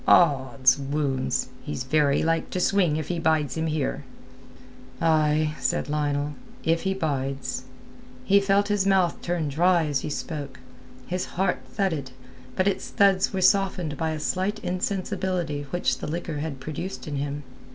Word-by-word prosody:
"Od's 135 -4 +5
wounds! 135 -2 -1
He's 145 -4 -4
very 140 +1 +2
like 165 0 +1
to 185 - -2
swing 180 -5 +3
if 155 -2 -4
he 175 -2 -1
bides 155 -4 +1
him 160 0 -1
here." 155 -3 -1 1.0
"Ay," 155 -1 +3
said - - 0
Lionel, 145 -1 0 0.3
"if 165 +1 +2
he 190 0 0
bides." 135 -6 -2 0.6
He 200 -4 +5
felt 200 0 +2
his 205 -2 +2
mouth 190 -3 +2
turn 175 -3 -1
dry 170 +3 +3
as 145 -3 0
he - - -4
spoke; 145 -4 -5 0.5
his 180 +1 -2
heart 190 +1 +1
thudded, 160 -10 -1 0.5
but 185 +1 +2
its 200 - 0
thuds 195 -3 +3
were 190 - -2
softened 185 -5 +2
by 160 +3 -1
a 155 -1 -3
slight 190 +7 -1
insensibility 185 -5 -2
which 175 +5 0
the - - -5
liquor 160 -1 -3
had 145 -3 -4
produced 155 +8 -5
in 145 -2 -3
him. 145 +1 -3
160 Hz, 155 wpm, -25 LUFS, 145-185 Hz, 1.0 s, Od's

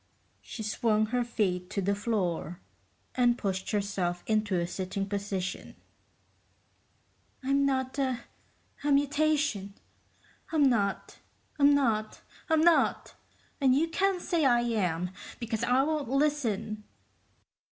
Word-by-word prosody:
She 220 - -7
swung 215 0 +1
her 245 -1 +2
feet 185 -6 -1
to 200 - -3
the 200 +1 +1
floor 190 -5 -2 0.5
and 245 -1 +3
pushed 190 -2 -3
herself 195 -4 -1
into 215 -4 +1
a 170 - 0
sitting 190 +2 -4
position. 195 -2 -4 1.7
"I'm 275 +1 +2
not 260 0 -1
a... 260 -3 0 0.6
a 290 - +1
mutation. 285 -8 +1 0.8
I'm 315 -3 +3
not, 215 -7 +1 0.4
I'm 285 0 +6
not, 220 -6 0 0.3
I'm 320 -1 +4
NOT, 340 0 +3 0.5
and 260 -2 +5
you 325 +4 +2
can't 380 +1 0
say 335 -3 +1
I 240 -3 +4
am, 180 -7 -1 0.3
because 225 -2 -3
I 255 +2 +3
won't 300 -4 -1
listen!" 255 -7 0
230 Hz, 120 wpm, -29 LUFS, 200-280 Hz, 1.7 s, I'm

